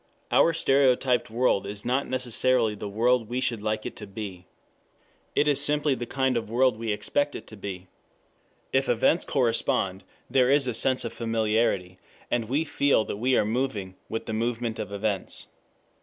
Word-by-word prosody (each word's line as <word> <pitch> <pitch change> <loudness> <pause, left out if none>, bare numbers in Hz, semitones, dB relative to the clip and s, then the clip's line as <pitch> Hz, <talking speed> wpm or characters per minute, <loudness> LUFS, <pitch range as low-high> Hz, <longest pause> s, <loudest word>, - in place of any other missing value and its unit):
Our 165 - +5
stereotyped 135 -5 +2
world 115 -4 +1
is 100 0 -6
not 130 +3 0
necessarily 125 -2 +1
the 105 0 -6
world 115 +2 +1
we 125 +1 -1
should 120 -4 -1
like 110 0 -2
it - - -5
to 105 - -8
be. 95 -3 -8 0.9
It 150 - +3
is 140 -1 +3
simply 145 0 +2
the 120 -2 -4
kind 130 -1 0
of 115 -3 -2
world 125 +1 +3
we 115 -1 -2
expect 145 +7 -1
it - - -7
to 110 - -11
be. 95 -3 -7 0.9
If 135 +1 +2
events 120 +8 +2
correspond 115 -7 0 0.2
there 130 -1 +3
is 140 0 +4
a 125 - -1
sense 130 +2 +1
of 115 - -4
familiarity, 110 -5 0 0.3
and 115 -2 0
we 145 +5 +1
feel 145 -6 +2
that - - -5
we 125 +3 +2
are - - +3
moving 105 -5 -2
with 115 - -4
the 110 - -4
movement 115 0 -2
of 100 - -5
events. 100 -1 -3
115 Hz, 175 wpm, -26 LUFS, 105-130 Hz, 0.9 s, Our